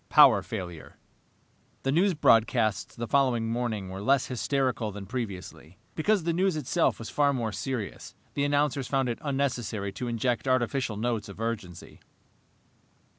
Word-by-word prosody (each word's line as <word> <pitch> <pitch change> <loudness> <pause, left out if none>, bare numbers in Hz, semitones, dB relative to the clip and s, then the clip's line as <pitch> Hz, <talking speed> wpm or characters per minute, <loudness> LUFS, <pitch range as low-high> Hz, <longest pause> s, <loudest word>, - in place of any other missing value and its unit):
Power - - +7
Failure 90 -4 -7 0.9
The 135 - +1
news 180 +5 +3
broadcasts 115 -5 +3
the 120 - -4
following 125 -3 +2
morning 115 -5 -2
were 95 +1 -6
less 135 +4 +3
hysterical 125 -1 -1
than 100 0 -8
previously. 95 -6 -6 0.2
Because 195 +3 +1
the 170 0 0
news 185 0 +2
itself 155 +3 +1
was 110 -4 -7
far 145 +5 +3
more 115 -4 -2
serious, 120 -1 -5 0.2
the 140 - 0
announcers 145 -2 +1
found 135 -2 +1
it 120 - -3
unnecessary 125 -8 -2
to 125 +5 -5
inject 120 +2 -1
artificial 130 -3 0
notes 110 -2 -2
of 100 - -10
urgency. 110 -7 -5
120 Hz, 145 wpm, -28 LUFS, 105-140 Hz, 0.9 s, Power